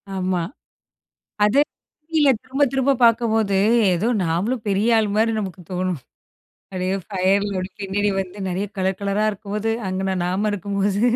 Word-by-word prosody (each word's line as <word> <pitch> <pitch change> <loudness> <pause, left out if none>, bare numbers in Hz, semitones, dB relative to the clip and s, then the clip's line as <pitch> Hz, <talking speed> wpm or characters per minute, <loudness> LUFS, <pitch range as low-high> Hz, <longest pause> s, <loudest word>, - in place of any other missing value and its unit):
ஆமா. 185 -1 0 1.0
அது 225 +7 +4 0.5
டிவியில 305 -4 +4
திரும்ப 270 +2 -2
திரும்ப 270 +1 +2
பார்க்கும்போது, 225 -4 +3 0.4
ஏதோ 205 +7 0 0.2
நாமளும் 205 +9 -1
பெரிய 215 +4 +3
ஆள் 215 -1 +1
மாரி 225 +1 +3
நமக்கு 190 -2 -6
தோணும். 180 -4 -1 0.7
அப்டியே 185 +1 -1
ஃபயர்ல 195 0 +1 0.2
பின்னாடி 205 +1 0
வந்து, 190 +2 -5
நெறைய 185 +3 -2
கலர் 190 +1 0
கலரா 200 +2 +1
இருக்கும்போது, 210 +2 -3 0.2
அங்கன 190 0 -1
நாம 195 +4 0
இருக்கும்போது 200 +1 -1
200 Hz, 130 wpm, -22 LUFS, 185-220 Hz, 1.0 s, அது